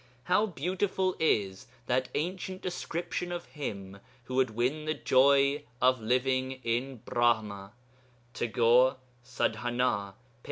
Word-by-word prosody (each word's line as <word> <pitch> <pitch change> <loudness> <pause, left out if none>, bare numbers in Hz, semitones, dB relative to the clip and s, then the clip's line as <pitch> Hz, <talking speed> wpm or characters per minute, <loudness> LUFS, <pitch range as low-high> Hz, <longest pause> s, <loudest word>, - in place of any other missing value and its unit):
How 195 +7 +2
beautiful 185 +3 -1
is 100 -11 0 0.2
that 130 +1 0
ancient 185 +3 -3
description 175 0 -3
of 175 -1 -4
him 100 -9 -6 0.2
who 130 - -8
would 130 -1 +3
win 125 +7 -1
the 155 0 -1
joy 140 +1 +4 0.2
of 130 -1 +3
living 130 +3 +1
in 120 +1 -2
Brahma 110 -4 0 0.6
(Tagore, 120 +2 +3 0.3
Sadhanâ, 120 -4 -1
p. - - -30
130 Hz, 115 wpm, -29 LUFS, 115-155 Hz, 0.6 s, joy